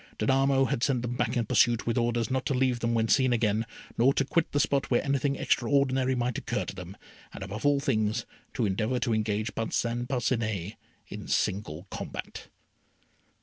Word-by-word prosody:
Danamo 135 +3 +3
had 140 -4 -1
sent 125 -2 +1
them 120 0 -3
back 120 -1 0
in 115 - +1
pursuit 120 +2 +3
with 115 - 0
orders 120 -1 0
not 130 0 0
to 140 - 0
leave 125 -1 +1
them 115 0 0
when 115 0 +2
seen 130 +1 +3
again, 110 -1 +1 0.3
nor 130 +4 +4
to 135 - +2
quit 165 +4 0
the 145 - +1
spot 140 -1 +1
where 120 - +2
anything 140 0 +1
extraordinary 130 0 +1
might 120 -1 -1
occur - - -2
to - - -6
them, - - -9 0.4
and, - - -7
above 105 +7 -3
all 145 -1 +3
things, 110 -4 0 0.3
to 120 - +1
endeavour 110 +5 0
to 120 -2 0
engage 110 0 -1
Parcin 120 +2 -1
Parcinet 115 -7 -1 0.3
in - - -8
single 90 -3 -1
combat. - - -6
120 Hz, 185 wpm, -28 LUFS, 110-135 Hz, 0.4 s, nor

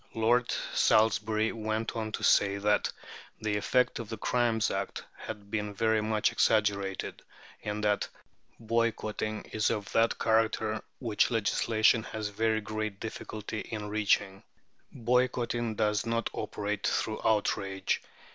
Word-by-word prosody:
Lord 115 +2 +3 0.2
Salisbury 110 0 +3
went 110 0 -2
on 110 -1 -3
to - - -3
say 100 0 +4
that 105 +1 +2 0.5
"the 110 -1 -1
effect 125 +5 +2
of 115 -3 -6
the 115 - -4
Crimes 115 0 +1
Act 95 0 -3
had 105 -2 -8
been 105 -2 -2
very 110 0 +2
much 110 0 +1
exaggerated," 100 -3 +1 0.4
and 105 0 -3
that 105 -1 +2 0.5
"boycotting 110 -2 -1
is 110 -1 +1
of 105 -3 -3
that 115 +1 +3
character 110 -1 +1 0.2
which 115 -5 +1
legislation 110 0 +3
has 110 -1 -4
very 110 +1 +1
great 110 -1 -4
difficulty 110 -1 -5
in 105 -1 -5
reaching." 100 -2 +1 0.5
"Boycotting 120 -1 0
does 105 0 +1
not 115 0 -1
operate 105 -1 -2
through 110 - -1
outrage. 95 -3 +1
110 Hz, 130 wpm, -30 LUFS, 105-115 Hz, 0.5 s, say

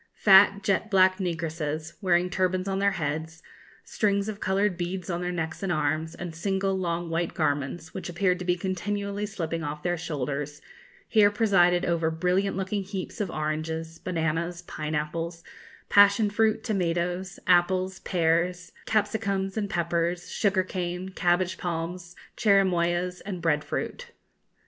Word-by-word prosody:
Fat, 200 0 +6
jet 200 +2 +1
black 185 -1 +4
negresses, 160 -3 -3
wearing 180 -2 +3
turbans 185 +1 0
on 195 0 -1
their 200 0 +2
heads, 160 +1 -4 0.4
strings 200 -1 0
of 215 -2 -5
coloured 195 0 +1
beads 180 +1 -4
on 170 +1 -2
their 180 0 -2
necks 160 -2 -4
and 195 -2 -1
arms, 155 0 -1
and 175 -1 -6
single 195 +3 -1
long 170 -2 -2
white 165 +1 -1
garments, 145 +3 -1
which 190 - -5
appeared 180 +1 +1
to - - -4
be 180 0 +2
continually 200 +3 -3
slipping 165 -5 -3
off 150 0 -5
their 175 0 0
shoulders, 145 -2 -3 0.5
here 210 -3 +5
presided 190 -5 +3
over 165 -2 +1
brilliant 180 +4 0
looking 195 +1 -1
heaps 190 +1 -5
of 200 - -1
oranges, 160 +1 -3
bananas, 170 0 -2
pineapples, 160 +2 -4 0.4
passion 205 +1 +5
fruit, 220 +1 +2
tomatoes, 180 -1 -1
apples, 185 +1 +2
pears, 175 +1 0 0.2
capsicums 200 -2 0
and 210 -2 -2
peppers, 170 +1 -1
sugar 195 -2 +2
cane, 180 0 -4
cabbage 180 0 +1
palms, 175 +1 -4 0.2
cherimoyas, 180 -3 +2
and 195 -3 -5
bread 150 -3 +1
fruit. - - -4
180 Hz, 140 wpm, -27 LUFS, 165-195 Hz, 0.5 s, Fat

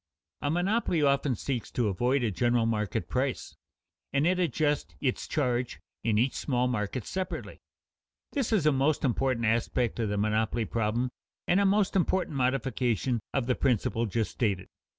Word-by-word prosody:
A 145 - 0
monopoly 175 0 +1
often 140 -2 +2
seeks 125 +2 -3
to 120 -3 +1
avoid 125 +7 +1
a 115 - +1
general 120 +3 +2
market 105 -4 -1
price, - - -2 0.6
and 140 - +2
it 180 +1 +2
adjusts 150 -3 0
its 130 -3 -1
charge 125 -5 -1 0.2
in 110 -2 +2
each 125 +4 +2
small 125 -3 0
market 115 -1 -2
separately. 185 0 -4 0.7
This 275 -7 -1
is 200 -9 +2
a 150 - +6
most 140 +2 +1
important 130 -2 +1
aspect 115 +1 0
of 110 -3 0
the 105 - -1
monopoly 110 +2 +1
problem 115 +3 -1 0.4
and 180 - +4
a 200 - +4
most 200 0 +2
important 185 -3 +1
modification 125 -2 0
of 135 -3 0
the 125 - +2
principle 120 -2 +1
just 110 +2 -1
stated. 100 -6 -1
125 Hz, 160 wpm, -29 LUFS, 115-145 Hz, 0.7 s, a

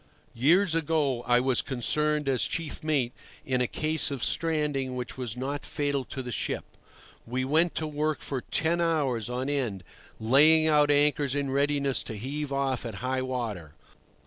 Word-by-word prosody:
Years 165 +9 +3
ago 150 -6 0
I 120 0 +5
was 130 0 +2
concerned 150 +3 0
as 130 -2 +2
chief 165 -3 -4
mate 140 -6 0 0.3
in 130 -1 0
a 125 - +2
case 155 +4 0
of 140 -4 -4
stranding 150 -5 0
which 125 -1 -5
was 125 -3 -4
not 140 +3 -3
fatal 145 -3 -2
to 130 +1 -6
the 125 - -6
ship. - - -2 0.6
We 130 +2 -1
went 160 +5 +2
to 160 - -1
work 150 0 -2
for 135 -3 -4
ten 170 +6 0
hours 140 -9 0
on 125 +2 -2
end, 125 -10 -2 0.4
laying 150 +8 +5
out 150 -2 +4
anchors 145 -1 +3
in 140 -2 -1
readiness 140 -1 +1
to 110 - -5
heave 140 +6 -4
off 135 -2 -1
at 115 -4 -6
high 130 0 0
water. 110 - -4
140 Hz, 170 wpm, -27 LUFS, 125-150 Hz, 0.6 s, I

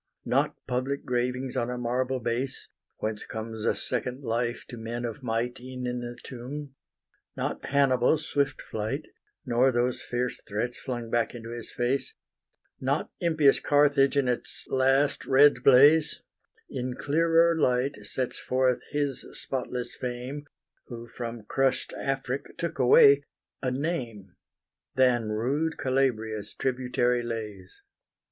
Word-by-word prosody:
Not - - +1
public 130 +3 -2
gravings 125 +1 -1
on 120 - 0
a 125 - -3
marble 125 +2 -1
base, 120 +3 -3 0.3
Whence 110 -1 -3
comes 110 0 -6
a - - +2
second 125 +3 -2
life 120 0 -1
to - - -7
men 115 +2 -4
of 115 +2 -5
might 120 0 -2
E'en 125 0 -7
in 125 0 -2
the 120 0 -6
tomb: 135 +3 -7 0.6
not - - -3
Hannibal's 140 +2 +3
swift 140 -1 0
flight, 110 +8 -3 0.4
Nor 125 +1 +3
those 120 0 0
fierce 125 0 -2
threats 115 +4 -3
flung 120 -3 -5
back 120 0 +1
into 115 -1 -8
his 120 -1 -5
face, 125 +3 -1 0.6
Not 135 +3 -1
impious 155 -5 +4
Carthage 145 -1 +3
in 140 -2 +3
its 125 -1 -3
last 135 +2 +2
red 135 -1 +6
blaze, 145 +4 +6 0.4
In 125 -1 -4
clearer 165 +4 +3
light 130 -3 +1
sets 125 +4 -3
forth 130 -1 +1
his 145 -3 -1
spotless 125 -2 -3
fame, 130 +4 -5 0.4
Who 120 -2 -8
from 115 -2 -6
crush'd 130 +4 0
Afric 135 0 -3
took 165 -3 -3
away 140 +2 +7 0.4
a 130 - 0
name, 125 - -3 0.6
Than 120 -3 +3
rude 135 +9 -1
Calabria's 110 -6 -1
tributary 125 -1 0
lays. 105 -5 -6
125 Hz, 130 wpm, -27 LUFS, 120-135 Hz, 0.6 s, away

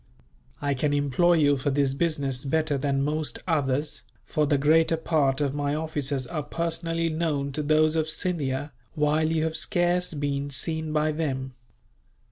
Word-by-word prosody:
I 140 -1 +1
can 145 +2 0
employ 145 +5 +3
you 145 -4 +4
for 130 +2 -1
this 140 -1 +1
business 140 -4 -1
better 155 +1 0
than 135 0 0
most 150 -3 -2
others, 145 -2 0 0.2
for 150 -1 0
the 145 -1 +3
greater 160 +3 +3
part 150 -4 +1
of 140 -2 0
my 145 0 -1
officers 145 -4 -2
are 155 +4 -3
personally 165 +2 -2
known 155 -4 -1
to 150 - -3
those 155 +1 +3
of 160 -1 0
Scindia, 145 -5 -1 0.2
while 155 +1 +2
you 160 -1 +1
have 160 0 -1
scarce 175 0 +1
been 140 -1 -2
seen 160 +4 -2
by 155 0 +1
them. 135 -4 -3
150 Hz, 160 wpm, -26 LUFS, 140-160 Hz, 0.2 s, you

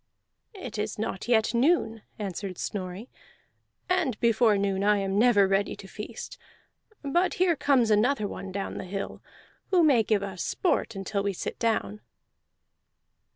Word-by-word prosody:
"It 370 - -7
is 210 0 -3
not 210 -1 -4
yet 225 -1 +3
noon," 235 -3 +2 0.2
answered 195 -2 -5
Snorri, 190 +3 -5 0.8
"and 280 - 0
before 230 -2 +3
noon 195 -1 0
I 210 0 +4
am 195 0 0
never 215 -4 +5
ready 195 +1 0
to 195 - -11
feast. 210 +3 -8 0.6
But 345 +8 +1
here 365 -4 +3
comes 260 -6 +2
another 215 +1 +2
one 195 -1 -7
down 195 +1 -4
the - - -6
hill, 195 +2 -5 0.5
who 360 -3 +4
may 275 -7 +5
give 210 -2 +1
us 190 -3 -5
sport 325 - 0
until 195 +1 -2
we 200 0 -1
sit - - -5
down." 105 - -1
210 Hz, 150 wpm, -27 LUFS, 195-245 Hz, 0.8 s, never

